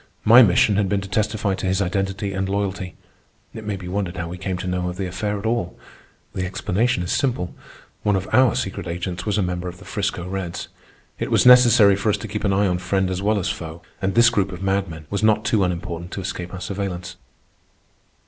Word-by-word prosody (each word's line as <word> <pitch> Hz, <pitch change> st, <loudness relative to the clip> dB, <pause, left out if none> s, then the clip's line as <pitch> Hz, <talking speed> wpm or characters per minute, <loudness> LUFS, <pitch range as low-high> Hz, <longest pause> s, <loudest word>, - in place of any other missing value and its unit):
My 115 Hz, +4 st, +9 dB
mission 100 Hz, -1 st, +4 dB
had 100 Hz, -2 st, +1 dB
been 100 Hz, -1 st, 0 dB
to 95 Hz, -, -7 dB
testify 105 Hz, 0 st, 0 dB
to 95 Hz, -, -3 dB
his 95 Hz, +1 st, +1 dB
identity 95 Hz, +1 st, -1 dB
and 95 Hz, 0 st, -2 dB
loyalty. 100 Hz, -2 st, -2 dB, 0.6 s
It 110 Hz, -, -8 dB
may 105 Hz, -1 st, -2 dB
be 95 Hz, -2 st, -8 dB
wondered 95 Hz, -1 st, -3 dB
how 85 Hz, 0 st, -4 dB
we 90 Hz, +1 st, -7 dB
came 95 Hz, -1 st, -3 dB
to 90 Hz, -, -6 dB
know 90 Hz, 0 st, -1 dB
of 90 Hz, -, -7 dB
the 95 Hz, -, -2 dB
affair 105 Hz, +3 st, -2 dB
at 100 Hz, -, -7 dB
all. 110 Hz, -6 st, -1 dB, 0.6 s
The 95 Hz, -, -2 dB
explanation 95 Hz, +3 st, 0 dB
is 85 Hz, -, -3 dB
simple. 125 Hz, -11 st, 0 dB, 0.5 s
One 105 Hz, -1 st, +2 dB
of 95 Hz, 0 st, -2 dB
our 130 Hz, -1 st, +5 dB
secret 95 Hz, -7 st, -3 dB
agents 85 Hz, +1 st, -4 dB
was 105 Hz, 0 st, +1 dB
a 100 Hz, -, +2 dB
member 90 Hz, 0 st, -3 dB
of 90 Hz, 0 st, -7 dB
the -, -, -14 dB
'Frisco 100 Hz, -4 st, -3 dB
Reds. 95 Hz, -2 st, -4 dB, 0.5 s
It -, -, -2 dB
was -, -, +3 dB
necessary 120 Hz, -5 st, +7 dB
for 100 Hz, +2 st, -1 dB
us 105 Hz, -, +2 dB
to 110 Hz, -, -7 dB
keep 105 Hz, +1 st, -4 dB
an 100 Hz, -, +2 dB
eye 100 Hz, +1 st, +2 dB
on 90 Hz, -2 st, 0 dB
friend 95 Hz, 0 st, 0 dB
as 95 Hz, 0 st, -2 dB
well 105 Hz, +2 st, +2 dB
as 95 Hz, -, -1 dB
foe, 80 Hz, +1 st, -6 dB, 0.2 s
and 95 Hz, 0 st, -1 dB
this 120 Hz, +1 st, +6 dB
group 100 Hz, -4 st, 0 dB
of 90 Hz, +1 st, -7 dB
madmen 95 Hz, -5 st, -1 dB
was 100 Hz, -, -1 dB
not 110 Hz, 0 st, +3 dB
too 110 Hz, -3 st, +2 dB
unimportant 85 Hz, -1 st, -3 dB
to 100 Hz, -, -4 dB
escape 90 Hz, -1 st, -5 dB
our 95 Hz, -, -7 dB
surveillance. 90 Hz, -3 st, -4 dB
95 Hz, 225 wpm, -22 LUFS, 90-105 Hz, 0.6 s, My